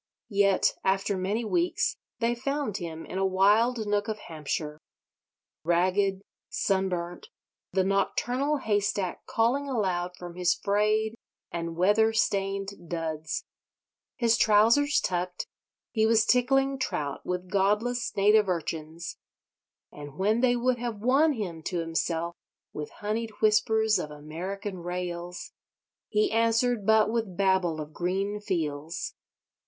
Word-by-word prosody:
Yet, 200 -1 +3
after 195 +1 +1
many 200 +5 -1
weeks, 345 +9 +1 0.2
they 235 0 +2
found 270 -3 -2
him 165 -2 -6
in 190 - -4
a - - +1
wild 210 +5 +3
nook 205 0 0
of 215 -1 -2
Hampshire. 155 -4 -4 0.8
Ragged, 185 +3 +2 0.3
sun 190 -1 +1
burnt, 175 -1 -4 0.4
the 190 +1 +2
nocturnal 245 +9 +1
haystack 205 -5 -1
calling 260 +5 +1
aloud 180 -7 -1
from 175 -1 -8
his 175 0 +2
frayed 215 +2 +1 0.4
and 170 -1 -4
weather 210 +5 +3
stained 195 -3 -1
duds, 160 -2 -3 0.7
his 230 -2 +3
trousers 230 +8 +4
tucked, 180 0 -2 0.5
he 220 -1 +2
was 225 -1 +4
tickling 270 +3 +3
trout 150 - -3
with 180 0 -4
godless 210 +5 +1
native 210 0 +5
urchins; 165 -1 -4 0.7
and 145 0 -10
when 215 +5 +2
they 250 -1 +4
would 245 0 +1
have 235 -2 -3
won 275 +7 +4
him 180 -9 -4
to 180 - -2
himself 165 0 -1 0.4
with 150 -1 -5
honied 220 +2 -1
whispers 220 0 +3
of 150 - -4
American 180 +7 -6
Rails, 175 0 -5 0.6
he 425 -2 +2
answered 230 -1 +2
but 220 -1 +5
with 220 -6 -2
babble 190 -4 +2
of 155 0 -7
green 195 +4 -1
fields. 160 -5 -3
200 Hz, 125 wpm, -28 LUFS, 175-225 Hz, 0.8 s, native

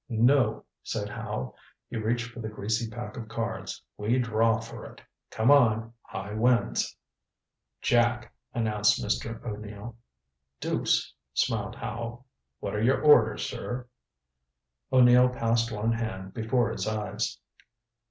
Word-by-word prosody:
"No," 120 0 +3 0.2
said - - -3
Howe. 65 0 -4 0.3
He - - -8
reached 115 +2 -1
for 120 - -10
the 110 -2 -4
greasy 110 +2 -2
pack 120 +4 -7
of 115 -2 -6
cards. 115 0 -4
"We 110 +4 +1
draw 115 -2 +2
for 115 +1 -9
it. - - -11 0.3
Come 110 +5 +3
on. 115 -5 +4
High 100 +2 -7
wins." 115 - +2 0.9
"Jack," 120 0 +2 0.2
announced 105 -3 +2
Mr. 115 +2 -2
O'Neill. 105 +1 -6 0.6
"Deuce," - - 0 0.2
smiled - - 0
Howe. 115 +2 -5 0.4
"What - - -4
are 105 - -1
your 125 +4 +3
orders, 120 -8 +5
sir?" 125 0 -5 1.1
O'Neill 125 -1 +7
passed 115 -1 +1
one 110 +1 0
hand 110 -5 -3
before 120 +1 +1
his - - -3
eyes. 105 -1 -2
115 Hz, 125 wpm, -28 LUFS, 110-120 Hz, 1.1 s, O'Neill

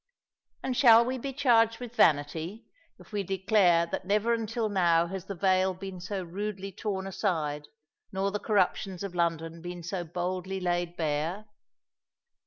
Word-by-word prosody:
And 260 - -1
shall 235 -3 +7
we 255 +1 -2
be 275 +3 -4
charged 230 -5 +3
with 245 -1 -8
vanity, 160 +6 +1 0.3
if - - -17
we 205 -1 -1
declare 190 -2 +3
that 170 - -4
never 210 +5 +1
until 225 0 -1
now 170 -4 +3
has 190 +1 -6
the 200 - -6
veil 185 0 +2
been 190 0 -7
so 190 +1 -4
rudely 195 +2 -5
torn 190 0 -3
aside, 155 -7 -2 0.4
nor 195 +1 -1
the 210 - -2
corruptions 195 -2 0
of 195 -3 -5
London 165 -1 -1
been 175 0 -7
so 180 +1 -3
boldly 180 +3 -3
laid 175 -1 -1
bare? 160 +6 -1
190 Hz, 155 wpm, -29 LUFS, 175-210 Hz, 0.4 s, shall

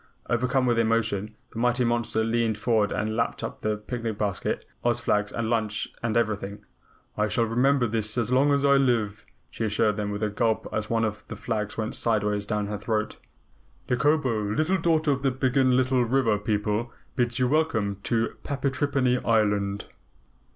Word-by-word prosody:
Overcome 125 +2 +2
with 120 -2 +2
emotion, 110 -2 0 0.2
the 115 - -6
mighty 125 +1 +2
monster 120 -2 +1
leaned 115 -1 0
forward 110 -3 +1
and 110 +1 -1
lapped 115 0 -1
up - - -5
the 105 0 0
picnic 115 0 -4
basket, 100 -2 -2 0.2
Oz 120 -1 +2
flags, 105 -2 0
lunch 110 -2 -1
and 115 -1 0
everything. 105 -2 -2 0.5
"I 105 0 +1
shall 115 +2 +1
remember 125 +3 +2
this 110 0 -1
as 120 0 0
long 135 +3 +4
as 140 0 +2
I 140 0 +5
live," 115 -6 +1 0.3
she - - -4
assured 105 0 +1
them 105 -1 -2
with 105 +1 -3
a 105 - 0
gulp 110 +1 0
as 105 0 -2
one 115 -1 +2
of 105 -1 -4
the - - -6
flags 105 -3 -3
went 110 0 -2
sideways 105 -2 0
down 105 -1 -1
her 105 0 -4
throat. 110 0 -2 0.7
"Nikobo, 130 -3 +2 0.2
Little 170 +4 +2
Daughter 160 -2 +2
of 135 -1 -1
the 135 - +2
Biggenlittle 130 -1 +2
River 120 -5 +2
People, 105 +2 -1 0.2
bids 120 -1 0
you 125 -1 +2
welcome 125 -9 +1
to 115 +1 -1
Patrippany 135 -2 0
Island." 105 -3 +1
115 Hz, 170 wpm, -26 LUFS, 105-125 Hz, 0.7 s, I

